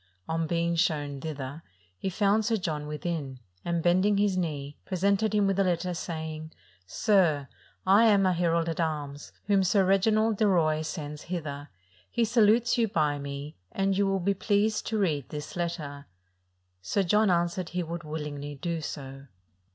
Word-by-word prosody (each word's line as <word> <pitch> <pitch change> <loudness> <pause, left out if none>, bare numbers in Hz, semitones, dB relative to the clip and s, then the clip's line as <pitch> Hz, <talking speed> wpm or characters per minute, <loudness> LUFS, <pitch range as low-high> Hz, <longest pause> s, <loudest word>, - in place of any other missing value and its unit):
On 165 0 -1
being 170 +1 0
shown 145 -5 0
thither, 145 -1 -5 0.3
he 190 - -3
found 205 +3 +2
Sir 225 +1 +1
John 155 -6 -3
within; 150 -4 -4 0.2
and, 170 -1 -1
bending 185 +4 +3
his 200 -2 +2
knee, 145 -5 -3
pre 185 - -4
sented 200 +3 +2
him 205 -1 +3
with 195 0 +1
a - - +5
letter, 180 0 0
saying, 160 -2 -5 0.3
"Sir, 160 - +2 0.4
I 200 +4 +6
am 200 -3 +5
a 185 - +3
herald 170 -1 +1
at 165 0 -3
arms, 145 -3 -3
whom 200 -1 +3
Sir 190 +1 +3
Reginald 215 +3 +3
de 215 - +3
Roye 155 -5 +2
sends 150 -2 -5
hither: 150 -5 -4 0.4
he 235 - +1
sa 230 +1 +2
lutes 230 +3 +4
you 230 - +3
by 150 -8 0
me, 140 +1 -6
and 195 0 0
you 200 0 +2
will 195 0 +1
be 195 +3 +1
pleased 205 +2 +1
to 220 - -1
read 155 -10 0
this 150 -1 -6
letter." 155 -5 -4 0.7
Sir 200 - 0
John 210 +3 +3
answered 175 0 0
he 180 0 -2
would 170 +1 -5
willingly 150 -2 -5
do 165 +3 -3
so. 135 -2 -7
170 Hz, 175 wpm, -28 LUFS, 150-195 Hz, 0.7 s, I